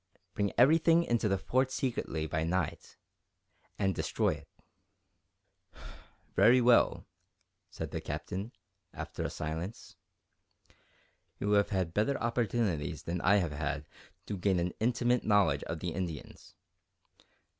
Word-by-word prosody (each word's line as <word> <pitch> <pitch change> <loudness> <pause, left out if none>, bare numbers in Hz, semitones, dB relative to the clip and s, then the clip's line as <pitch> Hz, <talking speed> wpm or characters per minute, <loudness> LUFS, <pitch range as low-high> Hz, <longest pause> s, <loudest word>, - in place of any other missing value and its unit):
"Bring 100 -1 0
everything 165 +6 +5
into 120 -6 +1
the 95 - +2
Fort 130 +7 +1
secretly, 120 - -2
by 80 0 -1
night, 85 -1 -2 0.8
and 95 -2 +1
destroy - - 0
it." - - -11 1.9
"Very 125 +2 +6
well," 120 -1 +4 0.6
said - - -6
the - - -3
Captain, 100 +6 -5 0.4
after - - -6
a - - -1
silence; 80 +7 -6 1.4
"you 105 - -1
have 100 -1 +4
had 95 -4 -1
better 110 +8 +1
opportunities 115 - -1
than 85 +1 -3
I 95 - +4
have 90 -6 +1
had 75 0 -3 0.4
to 100 - -4
gain 95 0 +2
an 85 +1 -1
intimate 120 +1 +1
knowledge 100 -9 +3
of 85 -1 -5
the 90 - -2
Indians. 85 -3 -6
100 Hz, 125 wpm, -31 LUFS, 85-120 Hz, 1.9 s, Very